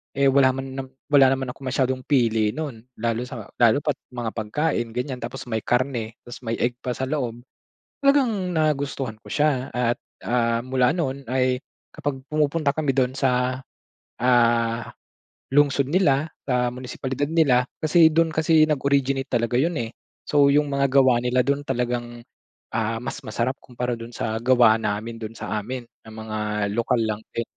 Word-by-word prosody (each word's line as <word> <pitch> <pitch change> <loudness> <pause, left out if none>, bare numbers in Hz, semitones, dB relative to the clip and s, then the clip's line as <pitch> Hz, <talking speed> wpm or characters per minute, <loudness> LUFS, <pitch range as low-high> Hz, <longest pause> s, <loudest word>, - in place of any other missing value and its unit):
eh, 140 0 +4
wala 130 -1 +4
man 135 0 -5
nam 130 - -5 0.2
wala 135 -2 +6
naman 130 -1 -4
akong 135 +1 -10
masyadong 130 0 -1
pili 115 -6 +2
nun. 145 -7 -5 0.2
Lalo 115 +2 -2
sa, 120 -3 -7 0.2
lalo 120 +4 +4
pa't 150 - -1 0.2
mga 120 -2 -3
pagkain 120 +1 -2
ganyan. 125 0 -3
Tapos, 120 0 -6
may 110 -2 -2
karne, 120 -2 -1
tapos 120 +1 -9
may 115 -2 -3
egg 120 +1 -1
pa 125 -2 -3
sa - - -4
loob. 125 -4 -3 0.6
Talagang 235 -10 +3
nagustuhan 140 -7 -1
ko - - -9
siya. 145 -4 +1
At, 120 -1 +1 0.3
ah, 115 -1 +2
mula 130 +1 +2
nun 140 -5 -3
ay 130 +1 +1 0.3
kapag 135 -2 -4
pumupunta 150 -1 +1
kami 150 -3 +1
dun 130 0 0
sa, 130 -1 0 0.5
ah, 120 -1 +3 0.7
lungsod 140 -1 +3
nila, 155 -4 +2 0.2
sa 125 -2 +1
munisipalidad 130 +2 -4
nila. 140 -6 +3 0.2
Kasi, 160 +1 +6
dun 160 +1 +3
kasi 160 0 +3
nag-originate 140 -2 +1
talaga 120 0 0
yun, 165 +5 +1
eh. 115 - -5 0.3
So, 145 -1 +3
yung 145 +1 +3
mga 140 0 +2
gawa 130 -2 +4
nila 125 +1 +2
dun 140 +3 -1
talagang, 120 -2 -2 0.5
ah, 115 +1 -2
mas - - -5
masarap 130 +3 -1
kumpara 125 -1 -4
dun 115 +1 -9
sa 110 0 -2
gawa 120 -2 +5
namin 110 +2 -3
doon 115 0 -7
sa 105 -1 -3
amin 125 +5 -5 0.2
ng 110 - -11
mga 110 -1 -5 0.4
lokal 115 0 +2
lang 110 -1 -1 0.2
din 115 - 0
130 Hz, 165 wpm, -24 LUFS, 120-140 Hz, 0.7 s, wala